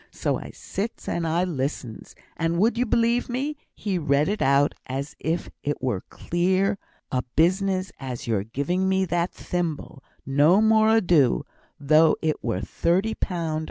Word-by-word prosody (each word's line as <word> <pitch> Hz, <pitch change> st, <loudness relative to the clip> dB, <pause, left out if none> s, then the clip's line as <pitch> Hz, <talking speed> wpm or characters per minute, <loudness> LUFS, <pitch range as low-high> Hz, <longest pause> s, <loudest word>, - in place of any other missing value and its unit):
So -, -, -2 dB
I -, -, -9 dB
sits 215 Hz, +4 st, -5 dB
and 170 Hz, -1 st, -1 dB
I 165 Hz, +3 st, +1 dB
listens. 135 Hz, -8 st, -4 dB, 0.2 s
And 165 Hz, +1 st, 0 dB
would 220 Hz, +5 st, +3 dB
you 245 Hz, +1 st, 0 dB
belie' 235 Hz, +2 st, +2 dB
me, 275 Hz, +5 st, -2 dB, 0.2 s
he 195 Hz, -4 st, -2 dB
read 145 Hz, +1 st, +2 dB
it 210 Hz, +1 st, -2 dB
out 140 Hz, +1 st, +3 dB
as 135 Hz, +2 st, -4 dB
if 165 Hz, +2 st, -2 dB
it 145 Hz, 0 st, -2 dB
were 125 Hz, -6 st, -1 dB
as -, -, -19 dB
clear 190 Hz, +3 st, +1 dB, 0.3 s
a 125 Hz, -, +1 dB
business 185 Hz, +3 st, +2 dB
as 130 Hz, -3 st, -6 dB
your 110 Hz, -4 st, 0 dB
giving 160 Hz, -, -1 dB
me 190 Hz, 0 st, +2 dB
that 175 Hz, 0 st, 0 dB
thimble 160 Hz, -5 st, -4 dB, 0.2 s
no 145 Hz, +8 st, +4 dB
more 220 Hz, 0 st, +4 dB
ado, 165 Hz, -, +3 dB, 0.3 s
though 155 Hz, +2 st, +5 dB
it 155 Hz, -1 st, -1 dB
were -, -, -1 dB
thirty 190 Hz, +6 st, 0 dB
pound! 165 Hz, -6 st, -2 dB
170 Hz, 160 wpm, -25 LUFS, 145-195 Hz, 0.3 s, though